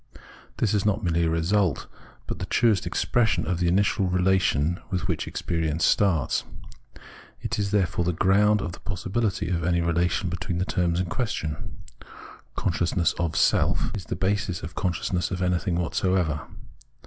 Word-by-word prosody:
This 110 - +1
is 105 -2 +2
not 105 +1 +1
merely 85 -1 +1
a - - +1
result, 85 +1 +1 0.4
but - - -5
the - - -4
truest 115 -4 +2
expression 120 -2 +1
of 90 -1 -1
the 90 - +1
initial 95 +2 +2
relation 90 -3 +2
with 90 -2 -2
which - - -2
experience 80 -1 -1
starts. 85 -10 +2 1.0
It - - -3
is, 100 -1 0
therefore, 90 -4 +1
the 90 - +1
ground 100 +4 +3
of 85 - -3
the - - -10
possibility 100 -1 -2
of 85 -2 -1
any 85 +1 +2
relation 85 +2 +1
between 85 0 -3
the 90 - 0
terms 90 -3 0
in 90 - 0
question: 85 -7 -4 0.3
" - - -17
consciousness 85 -1 +1
of 85 -2 -1
self - - +2
" - - -8
is 95 -5 -6
the - - -3
basis 95 -1 -1
of 80 - -4
the - - -5
consciousness 90 0 -1
of 90 - -3
anything 90 0 0
whatsoever. 85 -2 0
90 Hz, 170 wpm, -25 LUFS, 85-95 Hz, 1.0 s, ground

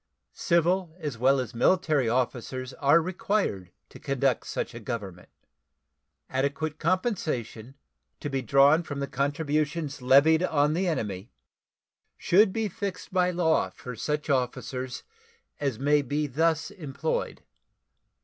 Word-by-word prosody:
Civil 170 0 +1
as 150 -9 -5
well 135 +2 +4
as 125 -2 -4
military 150 0 +2
officers 130 +1 -2
are 145 +4 +5
required 180 - -1 0.2
to - - -13
conduct 135 -2 0
such - - -3
a 115 - -7
government. 100 -6 -6 1.0
Adequate 140 +3 -2
compensation, 155 - -2 0.4
to - - -4
be 135 -2 -2
drawn 140 +6 +5
from 145 -4 -4
contributions 145 +2 -1
levied 140 +6 +5
on 150 -4 +2
the 180 +3 0
enemy, 105 - -3 0.9
should 195 +3 +4
be 220 +2 -1
fixed 195 0 -6
by 180 -1 +3
law 165 - +1
for 125 +6 -9
such 150 +6 -2
officers 130 -1 -2 0.6
as 140 -6 -1
may 145 +3 +3
be 145 +3 -1
thus 160 +5 0
employed. 155 -5 -4
145 Hz, 120 wpm, -27 LUFS, 130-165 Hz, 1.0 s, are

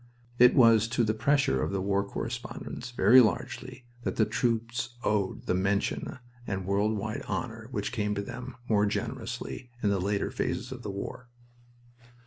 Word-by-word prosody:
It 125 +1 +7
was 115 -3 +6
to 120 - +4
the 110 -1 +2
pressure 120 - +2
of - - -1
the 100 - -1
war 100 +1 +1
correspondents, 100 - -5
very 125 +1 +7
largely, 125 +2 -2 0.2
that - - -2
the 110 - +3
troops 115 +1 -1
owed 100 -3 0
the - - +1
mention 95 +6 0 0.3
and 95 -2 -3
world 100 +3 +1
wide 110 +2 -3
honor 115 -3 -4
which 105 -5 -3
came 105 -4 -1
to 100 - -2
them, 125 +3 -7
more 105 -2 +3
generously, 120 +2 -4
in 105 - +3
the 100 -2 +1
later 100 +1 0
phases - - -2
of - - -6
the - - -5
war. 100 +5 -6
110 Hz, 165 wpm, -29 LUFS, 100-120 Hz, 0.3 s, It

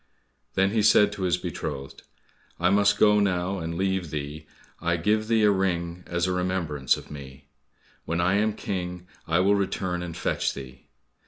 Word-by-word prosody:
Then 95 0 +3
he 110 0 +2
said 105 0 +5
to 105 - -7
his 90 -1 +2
beloved, 75 -6 -6 0.6
"I 90 +2 +3
must 105 +1 +3
now 105 0 +5 0.3
go 100 - -3
and 85 0 -4
leave 95 -2 0
thee, 75 +1 -5 0.3
I 85 0 0
give 105 +5 +1
thee 110 -1 +3
a 105 - +6
ring 90 -2 -1
as 85 0 0
a 90 - 0
remembrance 90 -7 0
of - - -12
me. 70 -1 -10 0.6
When 85 +1 -1
I 90 +2 +2
am 105 +1 +2
King, 90 -3 -4 0.2
I 80 +1 +2
will 100 +2 +4
return 95 -3 -1
and 85 -2 -6
fetch - - -1
thee." 65 -2 -10
90 Hz, 175 wpm, -26 LUFS, 80-100 Hz, 0.6 s, a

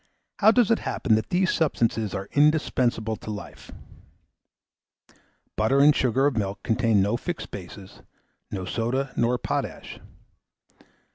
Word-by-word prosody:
How 215 - +5
does 230 -1 +4
it 230 - +3
happen 115 - -1
that 110 0 0
these 185 +1 +1
substances 115 - 0
are 95 0 -5
indispensable 130 -7 +1
to - - -10
life? 105 -1 -8 1.9
Butter 110 +6 +2
and 145 +1 +6
sugar 130 +2 +1
of 145 -3 +1
milk 100 -2 -3
contain 115 -4 +2
no 105 +4 0
fixed 175 +6 -6
bases, 95 0 -10 0.5
no 95 -2 -5
soda 120 +7 -2
nor 120 +1 +1
potash. - - -4
120 Hz, 130 wpm, -25 LUFS, 105-145 Hz, 1.9 s, and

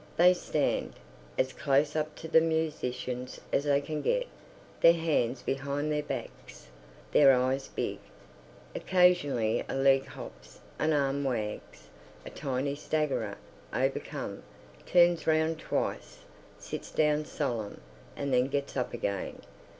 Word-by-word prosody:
They 180 +2 +7
stand, 180 - -1 0.4
as 130 0 +1
close 145 +1 +1
up 155 0 -1
to 160 - -8
the 160 0 +5
musicians 130 -6 -2
as 140 - +2
they 140 -1 +3
can 150 +1 -4
get, - - +1 0.5
their 170 0 +7
hands 135 -7 0
behind 140 +2 -2
their 150 0 +1
backs, 150 - -7 0.4
their 140 -2 +7
eyes 130 +1 +1
big. - - -3 0.7
Occasionally 175 -12 +2
a - - -2
leg 135 0 +4
hops, - - -11 0.2
an 155 - +2
arm 140 -1 +1
wags. 110 -6 -4 0.4
A - - -8
tiny 140 0 -2
staggerer, 150 0 -1 0.3
overcome, - - -2 0.5
turns 175 -2 +4
round 160 0 +2
twice, - - -3 0.3
sits - - -7
down 150 0 +2
solemn, 120 -10 -3 0.4
and 140 -2 -2
then 125 +1 +4
gets 140 0 -3
up 125 -2 -2
again. 100 -5 -3
140 Hz, 125 wpm, -30 LUFS, 130-155 Hz, 0.7 s, They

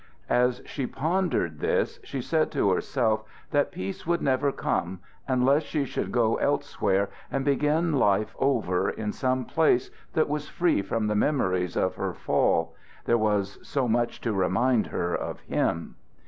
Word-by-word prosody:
As 125 0 +2
she 135 -4 -4
pondered 155 - -1
this - - 0
she 135 - -4
said 160 +2 +1
to 100 - +2
herself 110 +2 0 0.3
that 145 -2 +2
peace 95 +10 -6
would 170 0 +2
never 135 +1 +1
come 90 -7 -2 0.3
unless 130 +3 +3
she 150 -2 -2
should - - -3
go 115 -2 +2
elsewhere 100 +1 0 0.2
and 135 0 -1
begin 150 +4 +2
life 105 -6 +2
over 115 -10 +1
in 105 -1 -3
some 130 0 -1
place 150 -5 +2 0.2
that 155 - +2
was 150 0 -3
free 170 - +2
from 105 +3 -2
the 105 - +1
memories 95 - +1
of 95 - 0
her - - -2
fall, 80 0 +1 0.3
there 120 - +3
was 105 -2 0
so 135 -3 -1
much 120 +1 0
to 115 - -1
remind 110 +6 +2
her 85 0 -2
of - - -4
him. 85 0 -2
125 Hz, 160 wpm, -27 LUFS, 100-140 Hz, 0.3 s, unless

